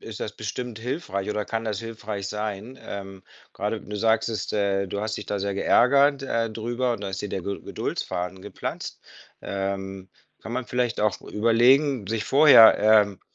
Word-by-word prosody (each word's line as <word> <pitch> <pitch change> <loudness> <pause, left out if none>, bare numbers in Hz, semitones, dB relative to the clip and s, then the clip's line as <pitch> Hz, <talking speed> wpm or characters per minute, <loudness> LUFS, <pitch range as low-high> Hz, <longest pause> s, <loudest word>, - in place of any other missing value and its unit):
ist 110 -1 -8
das 105 - -4
bestimmt 110 +2 -6
hilfreich 115 - -3
oder 105 0 -2
kann 115 +1 -3
das 105 -3 -2
hilfreich 110 -3 -6
sein, 105 +4 -5
ähm, 95 -1 -8 0.3
grade 105 +2 -3
du 105 +1 -7
sagtest, 110 +1 0
äh, 100 -2 0
du 100 - -3
hast 110 +1 -3
dich - - -6
da 105 - -3
sehr 100 0 -2
geärgert, 140 +7 +4
äh, 115 -3 -1
drüber, 120 +3 -2
und 105 - -5
da 100 - -3
ist 95 +1 -5
dir 105 - -4
der 95 - -3
Ged 100 +3 -5
Geduldsfaden 90 +1 -4
geplatzt. - - -6 0.4
Ähm, 95 -1 -4 0.3
kann 115 - -7
man 125 0 -3
vielleicht 125 -1 -1
auch 105 -3 +1
überlegen, 120 +3 +3
sich 110 -1 -2
vorher, 140 -5 +8
ähm, 105 -2 +4
110 Hz, 175 wpm, -25 LUFS, 100-115 Hz, 0.4 s, vorher